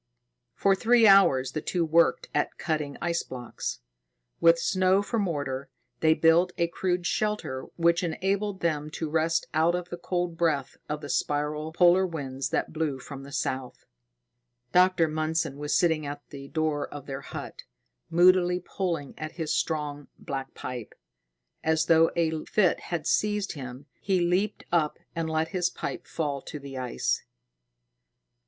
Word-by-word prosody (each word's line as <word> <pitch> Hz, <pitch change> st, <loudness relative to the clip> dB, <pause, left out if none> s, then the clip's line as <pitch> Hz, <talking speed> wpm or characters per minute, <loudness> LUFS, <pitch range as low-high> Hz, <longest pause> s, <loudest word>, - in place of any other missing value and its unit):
For 195 Hz, -, +3 dB
three 230 Hz, +4 st, +4 dB
hours 140 Hz, -11 st, +6 dB
the 155 Hz, -, -3 dB
two 175 Hz, +1 st, 0 dB
worked 170 Hz, +1 st, +3 dB
at -, -, 0 dB
cutting 150 Hz, -3 st, -2 dB
ice 170 Hz, -1 st, 0 dB
blocks. 125 Hz, -, -6 dB, 0.6 s
With 165 Hz, 0 st, +6 dB
snow 185 Hz, +3 st, +2 dB
for 230 Hz, +2 st, -1 dB
mortar, 140 Hz, -8 st, -2 dB, 0.3 s
they 160 Hz, 0 st, +4 dB
built 170 Hz, +3 st, +4 dB
a 170 Hz, -1 st, +1 dB
crude 180 Hz, 0 st, -1 dB
shelter 175 Hz, -12 st, -1 dB
which 170 Hz, 0 st, +3 dB
enabled 190 Hz, +4 st, -1 dB
them 150 Hz, -3 st, 0 dB
to 160 Hz, -, -2 dB
rest 160 Hz, +1 st, +1 dB
out 165 Hz, +2 st, +3 dB
of 180 Hz, 0 st, -4 dB
the 175 Hz, -, -5 dB
cold 175 Hz, -1 st, -2 dB
breath 150 Hz, -5 st, +1 dB
of 150 Hz, 0 st, -3 dB
the 145 Hz, -, -7 dB
spiral 150 Hz, +1 st, -1 dB
polar 175 Hz, +2 st, +5 dB
winds 135 Hz, -5 st, -4 dB
that 160 Hz, -, -1 dB
blew 155 Hz, -4 st, -1 dB
from 135 Hz, +1 st, -9 dB
the 140 Hz, +1 st, -11 dB
south. 130 Hz, -2 st, -3 dB, 0.9 s
Dr. 180 Hz, -2 st, +4 dB
Mundson 155 Hz, -1 st, -1 dB
was 150 Hz, 0 st, -1 dB
sitting 160 Hz, -3 st, +2 dB
at 145 Hz, 0 st, -7 dB
the 140 Hz, -1 st, -8 dB
door 155 Hz, -1 st, -1 dB
of 145 Hz, -2 st, -8 dB
their 135 Hz, -1 st, -5 dB
hut, -, -, -8 dB, 0.4 s
moodily 180 Hz, +1 st, +5 dB
pulling 170 Hz, -8 st, -3 dB
at 155 Hz, 0 st, -5 dB
his 160 Hz, -3 st, -2 dB
strong, 150 Hz, -2 st, -2 dB
black 135 Hz, -1 st, -6 dB
pipe. 125 Hz, -4 st, -6 dB, 0.7 s
As 160 Hz, 0 st, +2 dB
though 165 Hz, 0 st, +5 dB
a 160 Hz, -2 st, 0 dB
fit 195 Hz, -5 st, +2 dB
had 170 Hz, -3 st, -2 dB
seized 210 Hz, -1 st, +1 dB
him, 130 Hz, -1 st, -8 dB, 0.2 s
he 190 Hz, -2 st, +1 dB
leaped 180 Hz, +4 st, 0 dB
up 160 Hz, -3 st, +2 dB, 0.2 s
and 165 Hz, -1 st, -2 dB
let 160 Hz, 0 st, 0 dB
his 180 Hz, -3 st, 0 dB
pipe -, -, -6 dB
fall 145 Hz, -4 st, -2 dB
to 150 Hz, -, -7 dB
the 140 Hz, -1 st, -9 dB
ice. 125 Hz, -, -1 dB
160 Hz, 155 wpm, -27 LUFS, 145-175 Hz, 0.9 s, hours